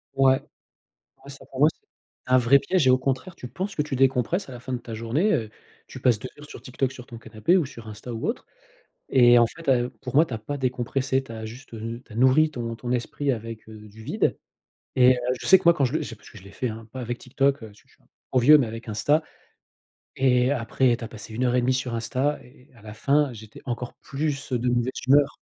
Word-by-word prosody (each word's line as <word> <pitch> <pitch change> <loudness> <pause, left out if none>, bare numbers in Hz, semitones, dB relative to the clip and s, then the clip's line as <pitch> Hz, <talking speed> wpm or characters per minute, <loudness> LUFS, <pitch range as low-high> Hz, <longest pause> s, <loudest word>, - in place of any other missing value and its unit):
Ouais, 135 -1 +4 0.8
ah 140 - -12
ça 135 - -11
pour 130 - -8
moi, 150 - +6
c'est - - -38 0.5
c'est 125 - 0
un 130 - +8
vrai 130 +3 +5
piège 180 -3 +1
et 130 - +6
au 130 - +4
contraire, 135 +7 -2
tu 125 - -8
penses 190 - -5
que 150 - +1
tu 145 -3 -3
décompresses 135 - +1
à 130 - -10
la 120 - -8
fin 130 +1 -6
de - - 0
ta 120 -1 -9
journée, 125 - 0
heu, 110 -3 -1 0.4
tu - - -10
passes 120 -4 +3
2 130 - -6
heures 150 - -10
sur - - -11
TikTok, 130 0 -2
sur 125 -2 -11
ton 115 - -9
canapé 115 - +1
ou 165 - +1
sur 115 -4 -11
Insta 110 +3 -8
ou 115 - -3
autre, 230 - -3 0.6
et 120 -2 +6
en 120 - +5
fait, 165 +5 -11
heu, 125 -1 +3
pour 125 - -7
moi 155 +4 +6
tu 130 - -11
as 115 - -2
pas 145 +7 -5
décompressé, 130 +1 -1
tu 115 - -10
as 110 -1 -7
juste, 115 +3 -10
heu, 115 +1 -6
tu - - -15
as - - -10
nourri 130 +6 +4
ton 115 -3 -4
ton 120 +1 -4
esprit 135 +3 -1
avec, 115 -1 -7
heu, 110 - -10
du 105 +2 -15
vide. - - 0 0.6
Et 130 0 +6
heu, 125 - -4 0.2
je - - -6
sais 190 - +8
que - - -14
moi 170 0 +7
quand 140 - +1
je 125 - -1
le 155 - 0
c'est 115 -6 -7
parce 105 - -17
que - - -13
je - - -16
l'ai 100 - -13
fait, 125 +5 -3
hein, 110 0 -8
pas 130 - -6
avec 120 0 -4
TikTok, 135 0 0
heu, - - -7
parce 105 - -19
que - - -35
je - - -26
suis - - -33
un - - -31
peu - - -40 0.2
trop 130 - +4
vieux 150 +5 +8
mais 135 - +1
avec 115 +1 -8
Insta, 130 +9 +2 0.9
et 125 -1 +3
après 125 -1 +1
tu 115 - -8
as - - -6
passé 110 0 -10
1 125 - -1
heure 125 0 +1
et - - +4
demie 130 +1 +1
sur 125 -2 -2
Insta, 130 +6 -1
et 130 +2 -20
à 115 - -18
la 105 -1 -9
fin, 140 +3 +2
j'étais 110 -1 -12
encore 120 0 -4
plus, 140 -1 -4
heu, 125 - +2
de 125 +2 -1
mauvaise 120 +1 +1
humeur, 140 +2 +4
125 Hz, 275 wpm, -25 LUFS, 115-135 Hz, 0.9 s, un